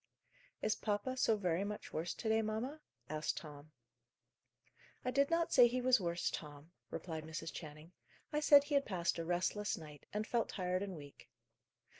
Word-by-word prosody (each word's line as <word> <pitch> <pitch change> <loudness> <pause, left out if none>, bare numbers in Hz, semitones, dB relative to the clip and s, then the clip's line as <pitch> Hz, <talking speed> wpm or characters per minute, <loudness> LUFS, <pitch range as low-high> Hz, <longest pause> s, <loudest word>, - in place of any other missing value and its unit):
"Is 215 - +3
papa 215 +5 -1
so 225 -4 +3
very 180 -2 0
much 210 +1 -5
worse 165 +2 -2
to 225 - -5
day, 220 0 +4
mamma?" 225 +8 -3 0.3
asked 155 +2 -2
Tom. 150 -1 -9 1.3
"I 255 - +1
did 280 +2 +3
not 335 0 +1
say 245 -3 +9
he 250 +2 -1
was 250 -3 +4
worse, 170 -1 0
Tom," 150 +1 -7 0.2
replied 160 -3 -5
Mrs. 160 +1 -5
Channing. 155 +1 -9 0.4
"I 300 - +2
said 290 -1 +8
he 290 +1 -5
had 280 -1 +4
passed 175 -4 0
a - - -1
restless 180 +5 0
night, 150 -3 -11
and 210 +1 -1
felt 235 0 0
tired 185 -1 -1
and 195 -2 -4
weak." 145 -3 -12
195 Hz, 175 wpm, -36 LUFS, 160-245 Hz, 1.3 s, say